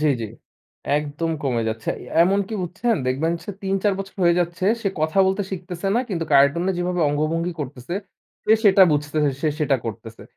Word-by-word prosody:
জি, 155 Hz, -, +2 dB
জি। 115 Hz, -, -3 dB, 0.7 s
একদম 150 Hz, +2 st, -2 dB
কমে 125 Hz, -4 st, 0 dB
যাচ্ছে। 110 Hz, 0 st, -5 dB
এ -, -, -10 dB, 0.2 s
এমন 190 Hz, +3 st, +3 dB
কী 220 Hz, -, -4 dB
বুঝছেন, 220 Hz, +7 st, -1 dB
দেখবেন 145 Hz, +6 st, 0 dB
সে -, -, -5 dB
৩-৪ 195 Hz, +1 st, +1 dB
বছর 195 Hz, 0 st, -6 dB
হয়ে 170 Hz, 0 st, +4 dB
যাচ্ছে, 175 Hz, +1 st, -2 dB, 0.2 s
সে 200 Hz, -, +1 dB
কথা 155 Hz, +4 st, 0 dB
বলতে 190 Hz, +2 st, +1 dB
শিখতেসে 185 Hz, 0 st, -4 dB
না -, -, +3 dB
কিন্তু 170 Hz, -5 st, -2 dB
কার্টুনে 145 Hz, +7 st, +4 dB
যেভাবে 180 Hz, 0 st, -1 dB
অঙ্গভঙ্গি 160 Hz, +4 st, -1 dB
করতেসে, 135 Hz, +3 st, -6 dB, 0.5 s
সে 215 Hz, -, +4 dB
সেটা 195 Hz, -1 st, +7 dB
বুঝতেছে, 150 Hz, 0 st, +1 dB
সে 155 Hz, -, +2 dB
সেটা 140 Hz, -2 st, +2 dB
করতেসে। 115 Hz, 0 st, -7 dB
165 Hz, 180 wpm, -22 LUFS, 145-190 Hz, 0.7 s, সেটা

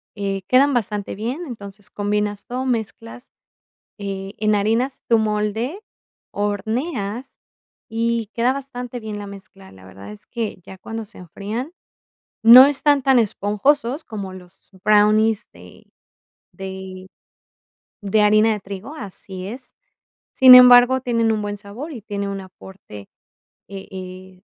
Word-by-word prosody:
eh, 195 Hz, -2 st, -3 dB
quedan 275 Hz, +2 st, +4 dB
bastante 210 Hz, -4 st, -2 dB
bien, 240 Hz, -, -4 dB
entonces 205 Hz, -4 st, -10 dB
combinas 205 Hz, 0 st, -2 dB
todo, 255 Hz, +2 st, -4 dB
mezclas, 230 Hz, +1 st, -5 dB, 0.7 s
eh, 195 Hz, 0 st, -6 dB
enharinas 220 Hz, +5 st, 0 dB
tu 230 Hz, -1 st, +4 dB
molde, 220 Hz, -, -2 dB, 0.5 s
horneas, 220 Hz, -, -3 dB, 0.5 s
y 230 Hz, 0 st, -1 dB
queda 240 Hz, +2 st, +1 dB
bastante 250 Hz, -3 st, -7 dB
bien 215 Hz, -2 st, -6 dB
la 205 Hz, -, -7 dB
mezcla, 195 Hz, -1 st, -13 dB
la 95 Hz, -1 st, -16 dB
verdad 95 Hz, +2 st, -12 dB
es 105 Hz, -, -14 dB
que 225 Hz, -5 st, -5 dB
ya 190 Hz, -, -11 dB
cuando 225 Hz, +4 st, -7 dB
se 210 Hz, -, -8 dB
enfrían, 210 Hz, -, -6 dB, 0.7 s
no 250 Hz, +3 st, +11 dB
están 285 Hz, 0 st, +2 dB
tan 265 Hz, -2 st, +4 dB
esponjosos 235 Hz, -, 0 dB
como 200 Hz, -4 st, -7 dB
los 180 Hz, -1 st, -15 dB
brownies 215 Hz, +1 st, +3 dB
de -, -, -16 dB, 0.7 s
de 190 Hz, -1 st, -9 dB, 0.9 s
de 210 Hz, +1 st, +1 dB
harina 215 Hz, +1 st, +4 dB
de 210 Hz, -, -4 dB
trigo, 200 Hz, +9 st, -9 dB
así 190 Hz, -5 st, -8 dB
es, 255 Hz, +3 st, -10 dB, 0.6 s
sin 260 Hz, -1 st, +9 dB
embargo, 250 Hz, +1 st, +8 dB
tienen 230 Hz, -3 st, +1 dB
un 215 Hz, -, -2 dB
buen 205 Hz, 0 st, -4 dB
sabor 225 Hz, +10 st, -9 dB
y 245 Hz, -, -8 dB
tiene 200 Hz, -1 st, -4 dB
un 195 Hz, 0 st, -5 dB
aporte, 185 Hz, -, -13 dB, 0.6 s
eh 195 Hz, -1 st, -9 dB
eh, 185 Hz, 0 st, -10 dB
210 Hz, 130 wpm, -21 LUFS, 195-245 Hz, 0.9 s, no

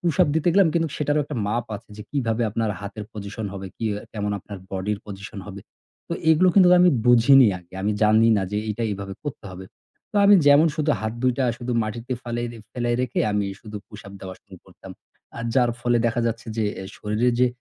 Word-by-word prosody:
pushup 175 Hz, 0 st, +2 dB
দিতে 160 Hz, +2 st, +1 dB
গেলাম 195 Hz, -3 st, +5 dB
কিন্তু 165 Hz, -1 st, +1 dB
সেটারও 150 Hz, 0 st, +1 dB
একটা 145 Hz, -1 st, -6 dB
মাপ 115 Hz, +3 st, -1 dB
আছে 110 Hz, +3 st, -17 dB
যে 105 Hz, -, -8 dB
কিভাবে 120 Hz, -5 st, -1 dB
আপনার 110 Hz, +1 st, -1 dB
হাতের 105 Hz, +1 st, -7 dB
position 105 Hz, +1 st, -6 dB
হবে, 95 Hz, -1 st, -6 dB
কি -, -, -5 dB, 0.3 s
কেমন 105 Hz, -1 st, -3 dB
আপনার 100 Hz, +1 st, -9 dB
body 95 Hz, +2 st, -2 dB
র -, -, -14 dB
position 100 Hz, +1 st, -8 dB
হবে। 100 Hz, -1 st, -8 dB, 0.5 s
তো -, -, -3 dB, 0.2 s
এগুলো 170 Hz, +4 st, +5 dB
কিন্তু 185 Hz, -3 st, +7 dB
আমি 180 Hz, 0 st, +6 dB, 0.2 s
বুঝিনি 120 Hz, +2 st, +7 dB
আগে। 90 Hz, -1 st, -22 dB
আমি 105 Hz, +2 st, +1 dB
জাননি 110 Hz, +1 st, +5 dB
না -, -, -1 dB
যে 105 Hz, -, 0 dB
এইটা 105 Hz, +2 st, -3 dB
এইভাবে 100 Hz, -1 st, -5 dB
করতে 145 Hz, -7 st, -6 dB
হবে। 95 Hz, +1 st, -9 dB, 0.5 s
তো -, -, -5 dB
আমি 205 Hz, +1 st, +8 dB
যেমন 145 Hz, +3 st, +7 dB
শুধু 155 Hz, 0 st, 0 dB
হাত 110 Hz, 0 st, -2 dB
২ 130 Hz, -1 st, +3 dB
টা 135 Hz, -, +2 dB
শুধু 125 Hz, 0 st, -4 dB
মাটিতে 115 Hz, +4 st, -5 dB
ফালাই 120 Hz, 0 st, -3 dB, 0.3 s
ফেলাই 120 Hz, -1 st, -1 dB
রেখে 125 Hz, -, -1 dB
আমি 105 Hz, -1 st, 0 dB
শুধু 105 Hz, -1 st, -9 dB
pushup 100 Hz, -2 st, -11 dB
দেওয়া 95 Hz, -1 st, -7 dB
শুরু -, -, -14 dB
করতাম। -, -, -14 dB, 0.5 s
আর 115 Hz, -, -5 dB
যার 125 Hz, -2 st, +3 dB
ফলে 120 Hz, 0 st, +2 dB
দেখা 115 Hz, +1 st, 0 dB
যাচ্ছে 115 Hz, +1 st, -3 dB
যে 110 Hz, -, 0 dB
অ্যা 95 Hz, -, -6 dB
শরীরের 110 Hz, +4 st, 0 dB
যে, 125 Hz, -, +5 dB
115 Hz, 210 wpm, -23 LUFS, 105-130 Hz, 0.5 s, আমি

